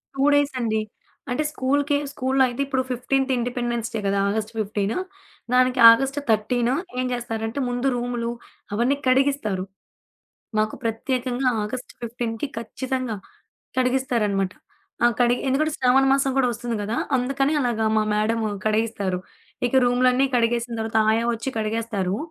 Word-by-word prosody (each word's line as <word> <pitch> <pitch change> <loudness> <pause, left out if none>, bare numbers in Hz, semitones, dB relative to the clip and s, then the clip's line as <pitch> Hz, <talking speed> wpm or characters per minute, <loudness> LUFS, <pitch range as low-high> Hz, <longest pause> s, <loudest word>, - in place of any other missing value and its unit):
2 270 - 0
డేసండి. 250 -7 +1 0.5
అంటే 250 +5 0
స్కూలుకి 285 +1 +1
స్కూలులో 265 0 +1
అయితే 245 +2 -4
ఇప్పుడు 265 -1 0
15థ్ 265 +2 0
ఇండిపెండెన్స్ 240 -1 -2
డే 220 - -1
కదా! 200 0 +1
ఆగస్ట్ 215 +1 -2
ఫిఫ్టీను 205 0 -1 0.6
దానికి 255 0 +3
ఆగస్ట్ 270 +4 +1
13 235 +3 +2 0.3
ఏం 255 - 0
చేస్తారంటే 225 +1 -3
ముందు 245 +2 -1
రూములు 240 -1 -2 0.4
అవన్నీ 240 +6 +2
కడిగిస్తారు. 255 -8 +1 0.9
మాకు 215 0 +1
ప్రత్యేకంగా 250 +2 -1
ఆగస్ట్ 250 +4 -5
15కి 235 +2 -3
ఖచ్చితంగా, 255 0 -3 0.6
కడిగిస్తారనమాట. 235 -7 +1 0.5
ఆ - - +8
కడిగి 245 0 +3
ఎందుకంటే 305 +4 +1
శ్రావణ 260 +1 +4
మాసం 275 -1 +2
కూడా 255 -2 +3
వస్తుంది 235 0 -4
గదా! 215 +3 -2 0.2
అందుకని 275 +4 0
అలాగా 235 -4 0
మా 215 - +4
మ్యాడము 220 +1 +1 0.2
కడిగిస్తారు. 215 -4 0 0.5
ఇక - - -6
రూములన్నీ 250 +2 +3
కడిగేసిన 235 0 0
దర్వాత 220 0 0
ఆయా 225 +1 +2
వచ్చి 230 +4 -5
కడిగేస్తారు. 215 -3 -1
240 Hz, 130 wpm, -23 LUFS, 220-260 Hz, 0.9 s, ఆ